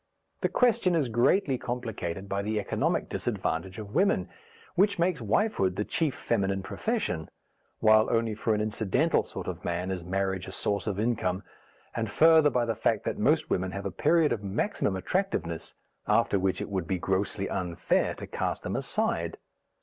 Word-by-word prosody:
The - - +2
question 220 -8 +3
is 145 -7 +1
greatly 125 - +2
complicated 110 -7 -4
by 100 0 -1
the 105 +1 -1
economic - - 0
disadvantage 95 +5 -2
of 105 -1 -8
women, 140 - +2 0.4
which 200 +3 +3
makes 170 -4 +1
wifehood 105 - +1
the 105 - -1
chief 155 -5 0
feminine 95 -4 0
profession, 155 - -2 0.5
while 110 0 +5
only 115 -1 +1
for 110 +1 0
an 105 - 0
incidental 110 - +1
sort - - -7
of - - -5
man 90 +2 -2
is 90 -2 -3
marriage 95 0 -1
a - - -6
source 100 +3 -1
of 100 -2 -1
income, 105 -5 0 0.5
and 115 -2 -1
further 160 +6 +6
by 125 -3 +1
the 115 - 0
fact - - 0
that - - -3
most - - +2
women 95 +1 +1
have 100 0 -5
a 100 - -2
period 155 - +3
of 105 - -1
maximum 100 - -1
attractiveness 95 - -2 0.3
after 100 - +3
which 95 0 0
it - - -4
would 95 -4 -2
be 95 - 0
grossly 95 +2 -1
unfair 90 -3 0
to - - -7
cast - - -3
them - - -3
aside. - - -1
105 Hz, 175 wpm, -28 LUFS, 95-130 Hz, 0.5 s, further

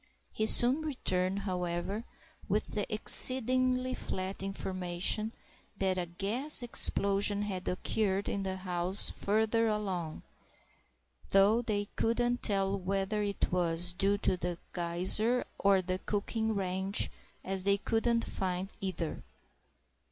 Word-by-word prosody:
He 215 - -1
soon 250 +7 +6
returned, 195 -10 -1
however, 180 +3 -4 0.4
with - - -1
the - - -3
exceedingly 255 0 +5
flat 185 -3 -4
information 190 +2 -1 0.5
that 190 -1 0
a 175 - -3
gas 220 - +1
explosion 200 -3 +2
had 190 -3 -5
occurred 195 +1 -1
in 200 - -3
a 190 - -3
house 185 +1 0
further 220 +2 0
along, 190 -7 -3 1.1
though 200 +4 +4
they 210 -3 -2
couldn't 240 +1 0
tell 195 -1 0
whether 195 +3 -2
it 200 -1 -2
was 175 -1 0
due 195 +2 +1
to 190 -2 0
the 175 -1 -4 0.2
geyser 185 +8 +1
or 195 -2 +3
the 185 +1 -3
cooking 220 +2 -2
range, 190 +1 0 0.3
as 190 0 -2
they 200 0 +2
couldn't 230 +3 0
find 185 +1 -4
either. 180 -4 -4
195 Hz, 120 wpm, -30 LUFS, 185-220 Hz, 1.1 s, soon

